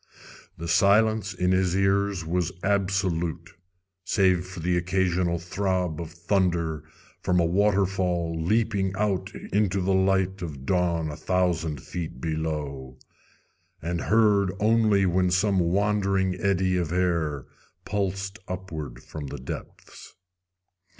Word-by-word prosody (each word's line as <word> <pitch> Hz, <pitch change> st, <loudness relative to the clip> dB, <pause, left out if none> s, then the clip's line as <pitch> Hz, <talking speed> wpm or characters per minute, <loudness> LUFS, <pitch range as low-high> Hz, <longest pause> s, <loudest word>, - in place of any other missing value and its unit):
The 85 Hz, 0 st, -6 dB
silence 105 Hz, +3 st, +3 dB
in 90 Hz, -2 st, 0 dB
his 95 Hz, -1 st, +2 dB
ears 100 Hz, -2 st, +1 dB
was 85 Hz, +1 st, 0 dB
absolute, 95 Hz, -4 st, 0 dB, 0.5 s
save 90 Hz, -2 st, +2 dB
for 90 Hz, -1 st, -8 dB
the 90 Hz, +2 st, 0 dB
occasional 90 Hz, -1 st, +1 dB
throb 90 Hz, -1 st, -2 dB
of 85 Hz, -, -6 dB
thunder 85 Hz, -3 st, 0 dB, 0.4 s
from 90 Hz, -1 st, +2 dB
a 85 Hz, -, +3 dB
waterfall 95 Hz, -2 st, +1 dB
leaping 100 Hz, -1 st, +1 dB
out 100 Hz, -2 st, -1 dB, 0.2 s
into 100 Hz, -2 st, +2 dB
the 95 Hz, +1 st, +1 dB
light 95 Hz, 0 st, +1 dB
of 75 Hz, -6 st, -6 dB
dawn 85 Hz, -3 st, +1 dB
a -, -, -6 dB
thousand 85 Hz, -6 st, 0 dB
feet 80 Hz, -7 st, -6 dB
below, 75 Hz, -4 st, -4 dB, 0.8 s
and 85 Hz, +1 st, -3 dB
heard 105 Hz, -4 st, +3 dB
only 110 Hz, -2 st, +3 dB
when 90 Hz, 0 st, +2 dB
some 95 Hz, +2 st, +2 dB
wandering 95 Hz, +1 st, +1 dB
eddy 95 Hz, 0 st, +1 dB
of 85 Hz, -3 st, -1 dB
air 85 Hz, -6 st, 0 dB, 0.4 s
pulsed 95 Hz, +1 st, -2 dB
upward 80 Hz, -9 st, -6 dB
from 75 Hz, -3 st, -7 dB
the -, -, -6 dB
depths. 65 Hz, -, -9 dB
90 Hz, 120 wpm, -26 LUFS, 85-95 Hz, 0.8 s, silence